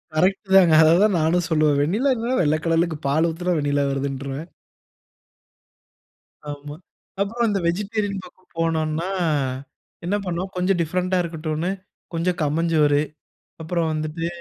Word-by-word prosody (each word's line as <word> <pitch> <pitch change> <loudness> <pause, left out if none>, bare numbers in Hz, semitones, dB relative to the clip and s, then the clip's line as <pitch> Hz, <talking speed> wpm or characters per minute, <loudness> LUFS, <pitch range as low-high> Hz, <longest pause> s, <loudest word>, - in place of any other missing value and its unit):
Correct 190 +4 +1
தாங்க. 180 -4 +7
அத 155 - +6
தான் 210 -3 +3
நானும் 165 +2 +2
சொல்லுவேன். 155 -3 +3
வெண்ணிலா 215 - +2
என்னன்னா, 240 +2 -1
வெள்ளக்கலர்லக்கு 165 +1 +1
பால் 155 +4 +2
ஊத்தினா, 175 +2 -1
வெண்ணிலா 145 -1 +1
வருதுன்றுவேன். 140 +2 -4 2.0
ஆமா. 145 0 -8 0.5
அப்புறம் 230 +4 0
இந்த 200 -1 0
வெஜிடேரியன் 200 +2 -2
பக்கம் 185 +1 -19
போனோன்னா, 165 +1 0 1.0
என்ன 190 +4 0
பண்ணோம், 180 +1 -3
கொஞ்சம் 180 +1 +1
டிஃபரென்ட்டா 180 +3 0
இருக்கட்டுன்னு 160 0 -3 0.4
கொஞ்சம் 175 +2 0
கம்மஞ்சோறு, 150 -1 +2 0.6
அப்புறம் 165 0 -1
வந்துட்டு, 155 +2 -3
165 Hz, 115 wpm, -22 LUFS, 155-185 Hz, 2.0 s, தாங்க